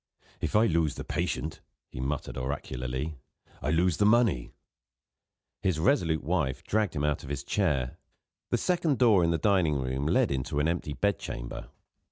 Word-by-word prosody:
"If - - -2
I 110 +2 +6
lose 80 -6 +1
the - - -5
patient," 80 - -2 0.3
he - - -8
muttered 70 +3 -3
oracularly, 65 +2 -4 0.4
"I 70 - -1
lose 85 +2 +2
the 105 - +3
money." 110 - +3 1.1
His 95 -5 +1
resolute 80 - +2
wife 65 - -1
dragged 105 -4 0
him 75 - -1
out 75 -1 +1
of - - -10
his 70 -1 -3
chair. 70 -8 0 0.5
The - - +2
second 170 -6 +1
door 110 -7 +5
in 85 - +3
the 85 - +2
dining 85 -3 +2
room 65 +1 -1
led - - +3
into 70 +2 -1
an 75 - +2
empty 85 -3 -2
bed 100 +7 0
chamber. - - -6
80 Hz, 170 wpm, -29 LUFS, 70-95 Hz, 1.1 s, I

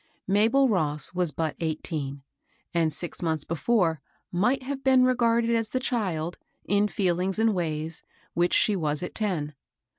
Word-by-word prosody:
Mabel 225 +8 +4
Ross 150 - +1
was 180 -2 +2
but 160 0 -2
eighteen, 155 -4 -3 0.5
and, 165 -2 +2
six 170 +3 -7
months 160 -3 0
before, 170 - +1 0.3
might 245 +10 +1
have 270 +1 -5
been 260 -1 +5
regarded 235 -2 +2
as 225 -1 +1
the 255 - -1
child, 185 -10 -2 0.3
in 205 +1 +2
feelings 185 -1 0
and 220 0 +3
ways, 160 -3 -2 0.3
which 175 +1 +2
she 210 - +3
was 150 -3 0
at 180 - -5
ten. 170 -9 -2
180 Hz, 150 wpm, -26 LUFS, 160-225 Hz, 0.5 s, been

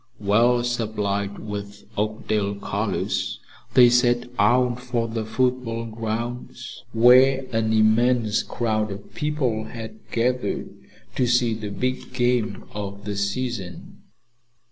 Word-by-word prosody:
Well 115 +4 +3
supplied 105 -4 -2
with 105 -1 -7
Oakdale 105 -1 -1
colors, 100 - -2 0.4
they 125 -1 +9
set 120 0 +3
out 125 0 +3
for 120 -2 -1
the 115 -1 -3
football 115 0 -1
grounds, 115 +2 -5
where 130 +3 +6
an 110 -1 +1
immense 110 +1 +3
crowd 110 -3 -1
of 100 +1 -9
people 150 -9 -1
had 115 -1 -8
gathered 125 +2 -1 0.4
to 125 - +2
see 120 -1 +3
the 110 -1 -5
big 125 +5 -3
game 120 -2 0
of 100 0 -6
the 105 -1 -3
season. 100 -3 -4
115 Hz, 115 wpm, -24 LUFS, 105-125 Hz, 0.4 s, they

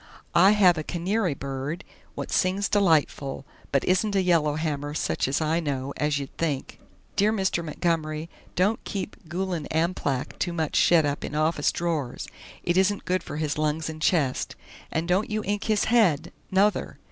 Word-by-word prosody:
I 190 +4 +7
have 180 -6 +5
a - - -3
kinary 180 0 -1
bird 140 +6 -4 0.3
wot - - -5
sings 190 +2 +2
deliteful 155 -8 +1 0.3
but 140 - +2
isn't 200 +3 +1
a 190 - +3
yellerhamer 150 -3 0
sutch - - 0
as 140 +4 0
I 160 +2 +1
know, 140 -3 -3
as 150 -1 0
you'd 140 -1 -6
think. 150 -5 -2 0.4
Dear 210 +2 +3
Mister 190 -5 0
Montgommery, 155 -1 -1 0.3
don't 200 +5 +1
keep 200 +1 -4
Gulan 175 -2 -2
Amplak 160 -5 -1
to 175 - -1
mutch 160 -3 -2
shet 165 -3 +5
up 145 0 -2
in 145 - -5
office 155 -1 +2
drors; 160 -7 -2 0.4
it 175 +1 +1
isn't 190 +2 +2
good 185 0 +1
for 150 - -7
his 150 -1 -1
lungs 155 +1 0
and 155 0 -10
chest. 150 -6 +1 0.4
And 160 +1 -1
don't 185 +4 +1
you 215 0 -1
ink 205 +2 -1
his 215 -2 +2
head 215 -11 +3 0.2
nother! 200 +2 +1
165 Hz, 170 wpm, -26 LUFS, 150-190 Hz, 0.4 s, I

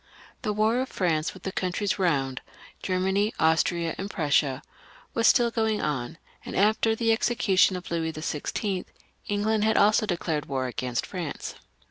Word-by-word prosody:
The 215 - -1
war 215 +3 +2
of 260 - -3
Prance 165 -3 0
with 185 - -13
the 190 - -3
countries 185 +2 -1
round 135 -8 0 0.2
— - - -21
Germany, 190 +3 0
Austria, 165 +1 +2
and 195 +1 -4
Prussia 145 -7 +1 0.2
— - - -25
was 230 0 +3
still 240 -2 +4
going 220 -2 0
on, 135 0 -2 0.3
and - - -7
after 220 +3 +3
the 225 0 +1
execution 225 -5 +3
of 180 -1 -7
Louis 165 -1 -1
XVI., 165 +5 -3 0.5
Eng 205 0 0
land 220 0 +1
had 220 0 +3
also 215 +1 +4
declared 165 -5 -2
war 130 -2 -1
agamst 125 -1 -2
Prance. 175 -7 -5
185 Hz, 165 wpm, -26 LUFS, 160-215 Hz, 0.5 s, still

